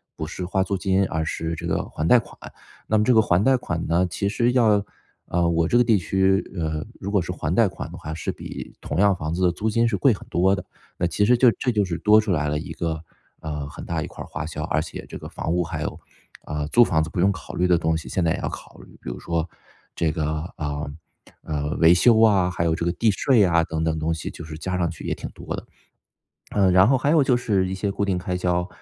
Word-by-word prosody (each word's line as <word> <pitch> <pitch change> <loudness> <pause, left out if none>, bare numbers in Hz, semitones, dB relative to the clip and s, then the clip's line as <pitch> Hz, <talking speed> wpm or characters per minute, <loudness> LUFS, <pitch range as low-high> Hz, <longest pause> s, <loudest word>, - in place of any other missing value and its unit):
不 80 - -4
是 90 +3 -5
花 95 +1 +1
租 100 +1 -2
金， 95 +1 +1
而 80 -2 -2
是 80 0 -3
这 80 - -5
个 - - -1
还 80 - -3
贷 125 - +7
款。 115 - -5 0.5
那 110 - +2
么 105 - +3
这 125 - +4
个 110 - +6
还 95 -2 +2
贷 135 +1 +4
款 85 -9 -3
呢， 85 +3 +2
其 100 - -2
实 120 +4 +1
要 110 -5 +4 0.4
啊， 85 -1 +1
我 85 -1 +2
这 120 - +3
个 120 - +6
地 115 -4 +3
区， 95 +2 +2
呃， 80 -2 -2 0.2
如 100 +1 -5
果 100 - +3
是 85 - -4
还 - - -3
贷 - - +4
款 - - -7
的 - - -9
话 80 0 -6
是 - - -3
比 - - -8
同 75 - -3
样 100 -1 +4
房 80 -2 -4
子 90 +2 -1
的 90 - +4
租 105 +6 -2
金 115 +2 +2
是 115 - 0
贵 130 +6 +4
很 100 - -5
多 95 +3 +3
的， 95 - -7 0.3
那 85 - 0
其 85 +4 0
实 120 +3 +4
就 125 -1 +6
这 125 - +1
就 105 -4 +1
是 85 -2 -4
多 105 +1 +6
出 110 -2 -1
来 75 -3 0
了 75 - 0
一 80 +1 -6
个， 80 -1 -3 0.4
呃， 75 -2 -4
很 - - -9
大 - - -2
一 - - -4
块 - - -9
儿 - - -12
花 - - -5
销， 75 -2 -5
而 - - 0
且 - - -8
这 - - -8
个 - - -9
房 80 - -3
屋 90 - +1
还 80 - -4
有 - - -5 0.5
啊， 75 -1 -3
租 120 - +7
房 80 -8 +2
子 80 - -6
不 - - -4
用 95 +3 +4
考 90 -4 -8
虑 90 +1 +1
的 90 - +4
东 80 0 0
西 80 - -5
现 90 - 0
在 80 - +2
也 - - -4
要 - - -2
考 - - -10
虑。 - - -15
比 - - -4
如 - - -7
说 85 0 -2 0.5
这 80 -2 +1
个， 80 +1 -3
啊， 75 0 -3 0.6
呃， 75 -1 -3
维 85 +1 +7
修 110 +5 +5
啊， 100 -5 +4
还 85 -2 -1
有 80 -1 +2
这 85 - -3
个 85 - +2
地 110 +4 +1
税 115 +2 +3
啊 85 -2 +3
等 80 0 -3
等 80 -1 0
东 80 +1 0
西， 80 - -5
就 85 - -9
是 80 -1 -8
加 90 +3 -3
上 85 -2 0
去 - - -10
也 - - -1
挺 - - -7
多 - - -6
的。 - - -8 0.9
嗯， 95 -3 +4
然 95 +2 +6
后 135 - +4
还 140 +3 +1
有 155 -3 +5
就 130 -2 +3
是 100 -6 0
一 95 - -3
些 100 +1 -2
固 100 - -1
定 95 -2 0
开 90 0 -3
销。 90 0 0
90 Hz, 295 characters per minute, -23 LUFS, 80-100 Hz, 0.9 s, 贷